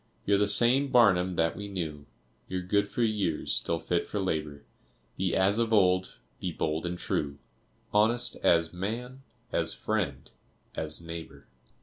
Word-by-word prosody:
You're 100 Hz, 0 st, +3 dB
the 105 Hz, -, +2 dB
same 125 Hz, +6 st, +5 dB
Barnum 95 Hz, -8 st, +4 dB
that 80 Hz, 0 st, +1 dB
we 105 Hz, -, -6 dB
knew, 80 Hz, -7 st, -5 dB, 0.4 s
You're 95 Hz, -1 st, -3 dB
good 100 Hz, +3 st, +1 dB
for 120 Hz, -, -2 dB
years, 105 Hz, -8 st, 0 dB
still 85 Hz, -, 0 dB
fit 85 Hz, +1 st, -1 dB
for 105 Hz, -, -3 dB
labor, 75 Hz, -6 st, -3 dB, 0.5 s
Be 95 Hz, -2 st, -1 dB
as 100 Hz, +3 st, +2 dB
of 115 Hz, -1 st, 0 dB
old, 95 Hz, -3 st, +3 dB, 0.2 s
be 90 Hz, -, -3 dB
bold 80 Hz, +1 st, -2 dB
and 90 Hz, 0 st, -4 dB
true, 70 Hz, -4 st, -2 dB, 0.6 s
Honest 115 Hz, +4 st, +2 dB
as 85 Hz, -1 st, +2 dB
man, 120 Hz, +8 st, -5 dB, 0.3 s
as -, -, 0 dB
friend, -, -, -3 dB, 0.4 s
as 75 Hz, +1 st, +1 dB
neighbor. 85 Hz, 0 st, -9 dB
95 Hz, 150 wpm, -28 LUFS, 85-105 Hz, 0.6 s, same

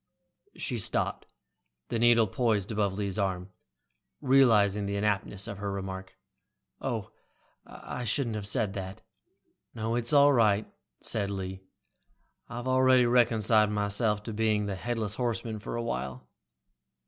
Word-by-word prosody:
She 125 Hz, -6 st, -3 dB
stopped, -, -, -1 dB, 0.6 s
the 115 Hz, -, -1 dB
needle 115 Hz, -1 st, +5 dB
poised 110 Hz, -1 st, 0 dB
above 105 Hz, -3 st, 0 dB
Lee's 100 Hz, 0 st, -3 dB
arm, 95 Hz, -1 st, -2 dB, 0.7 s
realizing 110 Hz, -7 st, +4 dB
the 100 Hz, -, -2 dB
inaptness 100 Hz, -1 st, -1 dB
of 100 Hz, -, -7 dB
her 100 Hz, -1 st, -3 dB
remark. 95 Hz, -1 st, -6 dB, 0.6 s
"Oh. 115 Hz, -6 st, -3 dB, 0.6 s
I 125 Hz, -, -7 dB
shouldn't 115 Hz, +1 st, 0 dB
have 105 Hz, -2 st, -4 dB
said 105 Hz, -3 st, 0 dB
that." 95 Hz, -1 st, -7 dB, 0.7 s
"No, 115 Hz, +1 st, -2 dB
that's 120 Hz, 0 st, 0 dB
all 145 Hz, -1 st, +6 dB
right," 110 Hz, -4 st, +3 dB, 0.4 s
said 100 Hz, -2 st, +3 dB
Lee. 95 Hz, -1 st, -5 dB, 0.9 s
"I've 120 Hz, +1 st, -6 dB
already 130 Hz, -1 st, +4 dB
reconciled 115 Hz, -3 st, +3 dB
myself 105 Hz, +1 st, 0 dB
to 110 Hz, -, -6 dB
being 105 Hz, -1 st, +1 dB
the 100 Hz, -, -3 dB
headless 110 Hz, 0 st, -3 dB
horseman 115 Hz, -2 st, -3 dB
for 100 Hz, -, -6 dB
a 120 Hz, -, -2 dB
while." 65 Hz, -, -4 dB
105 Hz, 135 wpm, -28 LUFS, 100-120 Hz, 0.9 s, all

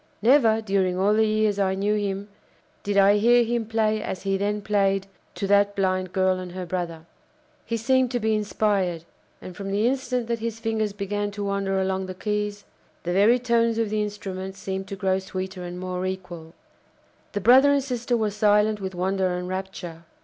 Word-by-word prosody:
Never, 230 Hz, -3 st, +5 dB
during 195 Hz, -3 st, 0 dB
all 200 Hz, +3 st, +3 dB
the 220 Hz, 0 st, +3 dB
years 215 Hz, -1 st, +1 dB
I 190 Hz, -1 st, +1 dB
knew 200 Hz, +2 st, 0 dB
him, 200 Hz, -1 st, -2 dB, 0.5 s
did 205 Hz, 0 st, -1 dB
I 200 Hz, +1 st, +6 dB
hear 240 Hz, +2 st, +5 dB
him 235 Hz, -1 st, -1 dB
play 220 Hz, -1 st, +1 dB
as 185 Hz, -, -5 dB
he 195 Hz, -1 st, 0 dB
then 205 Hz, +1 st, -1 dB
played 195 Hz, -2 st, +1 dB, 0.3 s
to -, -, -3 dB
that 200 Hz, 0 st, +3 dB
blind 185 Hz, -2 st, 0 dB
girl 185 Hz, -1 st, +1 dB
and 180 Hz, -1 st, -7 dB
her 185 Hz, -1 st, -5 dB
brother. 170 Hz, -3 st, -4 dB, 0.6 s
He 230 Hz, -, -1 dB
seemed 260 Hz, +2 st, +2 dB
to 245 Hz, 0 st, -1 dB
be 220 Hz, -1 st, +1 dB
inspired; 205 Hz, -5 st, 0 dB, 0.4 s
and, 180 Hz, -, -8 dB
from 200 Hz, -1 st, -6 dB
the 205 Hz, +3 st, +1 dB
instant 250 Hz, -1 st, 0 dB
that 235 Hz, 0 st, -2 dB
his 225 Hz, 0 st, -4 dB
fingers 220 Hz, -2 st, -1 dB
began 205 Hz, +1 st, -3 dB
to 205 Hz, 0 st, -4 dB
wander 200 Hz, -1 st, -1 dB
along 190 Hz, 0 st, -1 dB
the 185 Hz, -, -6 dB
keys, 210 Hz, +1 st, -3 dB, 0.4 s
the 175 Hz, -, -2 dB
very 210 Hz, +6 st, +5 dB
tones 230 Hz, -2 st, +1 dB
of 225 Hz, -2 st, 0 dB
the 215 Hz, 0 st, 0 dB
instrument 190 Hz, -2 st, -5 dB
seemed 190 Hz, 0 st, -5 dB
to 195 Hz, -, -5 dB
grow 190 Hz, -1 st, 0 dB
sweeter 185 Hz, -1 st, -6 dB
and 175 Hz, 0 st, -6 dB
more 185 Hz, 0 st, -4 dB
equal. 175 Hz, -3 st, -7 dB, 0.8 s
The 205 Hz, -, -2 dB
brother 260 Hz, +6 st, +6 dB
and 280 Hz, -1 st, +2 dB
sister 245 Hz, -2 st, -1 dB
were 215 Hz, -2 st, 0 dB
silent 210 Hz, 0 st, +2 dB
with 190 Hz, -1 st, -5 dB
wonder 185 Hz, 0 st, 0 dB
and 180 Hz, 0 st, -5 dB
rapture. 185 Hz, -3 st, -6 dB
200 Hz, 195 wpm, -24 LUFS, 190-220 Hz, 0.8 s, I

